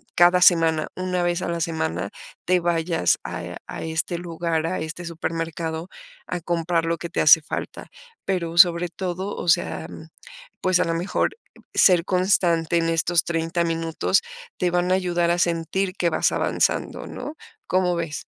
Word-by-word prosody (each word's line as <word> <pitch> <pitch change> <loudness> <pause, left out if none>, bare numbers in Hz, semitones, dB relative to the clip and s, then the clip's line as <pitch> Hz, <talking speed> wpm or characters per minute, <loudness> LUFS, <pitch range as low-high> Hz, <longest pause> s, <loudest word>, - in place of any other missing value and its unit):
cada 175 +1 +5
semana, 165 -3 +4
1 185 -1 -1
vez 175 0 0
a - - -2
la 170 -1 -2
semana, 90 - -2 0.4
te 180 0 +3
vayas 165 - +1
a - - -5
e - - -7
a - - -6
este 160 +2 -2
lugar, 165 -2 -2
a 185 - -2
este 165 +2 -6
supermercado 165 0 -4 0.4
a 180 - -4
comprar 170 0 0
lo 165 0 0
que 170 - -6
te - - -1
hace 155 +1 +7
falta. 150 - -6 0.4
Pero 170 -3 -2
sobre 170 0 +6
todo, 185 +3 -4
o - - -6
sea, 170 - +1
mm, - - -11 0.5
pues 185 -1 +2
a - - +3
lo 165 - -1
mejor 175 - -1 0.4
ser 180 -2 +5
constante 175 -3 +2
en 165 0 +1
estos 165 +1 +2
30 165 +1 -1
minutos 165 -1 0 0.4
te 180 - +1
van 180 +1 +1
a - - +5
ayudar 175 -2 +1
a 175 - 0
sentir 175 +2 0
que 170 - +1
vas - - +2
avanzando, - - -1
¿no? 300 - -7 0.3
¿Cómo 180 -1 +1
ves? 165 -4 -4
170 Hz, 170 wpm, -23 LUFS, 165-180 Hz, 0.5 s, hace